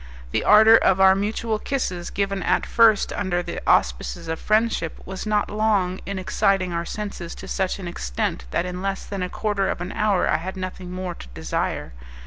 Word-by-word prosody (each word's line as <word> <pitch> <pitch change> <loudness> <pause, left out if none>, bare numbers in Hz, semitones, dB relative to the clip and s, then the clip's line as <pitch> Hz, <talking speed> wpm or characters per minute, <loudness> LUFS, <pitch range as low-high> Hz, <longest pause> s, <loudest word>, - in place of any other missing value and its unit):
The - - 0
ardour 220 +2 +8
of 190 -4 +3
our 190 0 +7
mutual 215 +2 -1
kisses, 180 -12 -3
given 195 -1 -2
at - - +1
first 225 -3 +4
under 180 -3 -1
the - - -5
auspices 60 -1 +1
of 160 0 -3
friendship, 215 -6 0
was 190 +3 -6
not 210 -1 +1
long 205 -4 +1
in 200 -1 -3
exciting 185 +1 +1
our 170 0 -2
senses 200 -4 -6
to 190 - -10
such 190 -1 -1
an 190 -3 -7
extent - - -3
that 170 - -1
in 180 0 -5
less 195 0 -3
than 200 -2 -5
a 180 - -2
quarter 205 -2 -1
of - - -2
an 180 +2 -5
hour 210 -3 +1
I - - +2
had 185 +4 -6
nothing 185 -1 -6
more 185 -1 -4
to - - -11
desire. - - -3
190 Hz, 195 wpm, -23 LUFS, 180-210 Hz, -, ardour